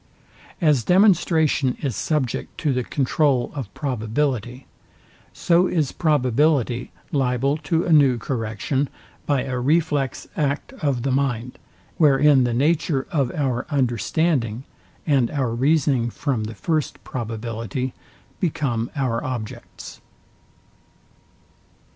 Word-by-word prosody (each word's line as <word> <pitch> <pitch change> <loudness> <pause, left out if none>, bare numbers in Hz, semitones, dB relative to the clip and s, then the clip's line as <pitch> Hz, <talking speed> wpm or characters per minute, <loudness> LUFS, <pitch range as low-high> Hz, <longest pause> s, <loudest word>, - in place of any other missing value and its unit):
As 150 -8 +3
demonstration 165 - +3
is 135 -7 -2
subject 145 -6 -2
to 150 -4 +1
the 125 0 -1
controul 135 -1 +1
of 130 -9 -6
probability, 125 -1 -2 0.7
so 175 +1 +2
is 155 -7 0
probability 135 -4 +1 0.2
liable 135 0 +1
to 160 +2 0
a 170 - +2
new 140 -5 +5
correction 115 +3 -2 0.4
by 140 -3 +1
a 130 -2 -3
reflex 145 0 0
act 145 - -1
of 135 -6 0
the 135 - 0
mind, 125 -3 -1 0.4
wherein 145 -4 +5
the 120 - 0
nature 145 0 +1
of 140 -8 +1
our 130 -4 -1
understanding, 125 - 0 0.4
and 135 -6 +2
our 130 -6 -1
reasoning 135 -2 +2
from 120 -3 -2
the 110 +1 -7
first 155 +5 -2
probability 115 +2 -4 0.5
become 130 - -1
our 125 -5 -1
objects. 120 -5 -7
135 Hz, 110 wpm, -22 LUFS, 120-150 Hz, 0.7 s, new